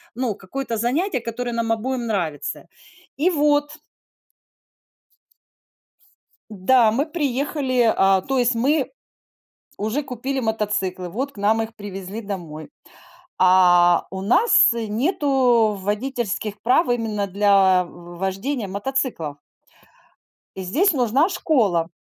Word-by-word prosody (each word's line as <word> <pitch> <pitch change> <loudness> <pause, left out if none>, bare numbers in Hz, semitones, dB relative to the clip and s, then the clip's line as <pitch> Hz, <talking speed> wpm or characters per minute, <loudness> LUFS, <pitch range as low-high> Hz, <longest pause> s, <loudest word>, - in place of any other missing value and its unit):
ну, 245 -5 -2
какое-то 230 +4 -5
занятие, 260 - 0
которое 240 +1 -5
нам 230 -1 -1
обоим 240 +1 -2
нравится. 170 -9 -3 0.5
И 335 +6 +2
вот. 290 -2 +1 2.8
Да, 220 +3 +3
мы 265 +7 0
приехали, 275 -5 0
а, 195 -1 +3
то 270 +4 -2
есть, 245 0 +2
мы 275 +4 +1 0.9
уже 220 +8 -2
купили 265 +1 -4
мотоциклы, 205 -6 -2
вот 265 +8 -4
к - - -21
нам 215 +3 +2
их 225 0 -6
привезли 200 +1 -7
домой. 175 -6 -7 0.7
А 175 -2 +5
у 190 0 -6
нас, 245 - +5
э, 230 -1 -3
нету 245 - +2
водительских 210 0 -3
прав 255 +8 +3
именно 225 -4 -1
для 195 -2 +3
в 175 0 -13
вождения 195 +5 -3
мотоциклов. 200 - -3 1.2
И 190 - -6
здесь 310 - +2
нужна 265 - +2
школа. 215 - +1
225 Hz, 110 wpm, -22 LUFS, 195-265 Hz, 2.8 s, А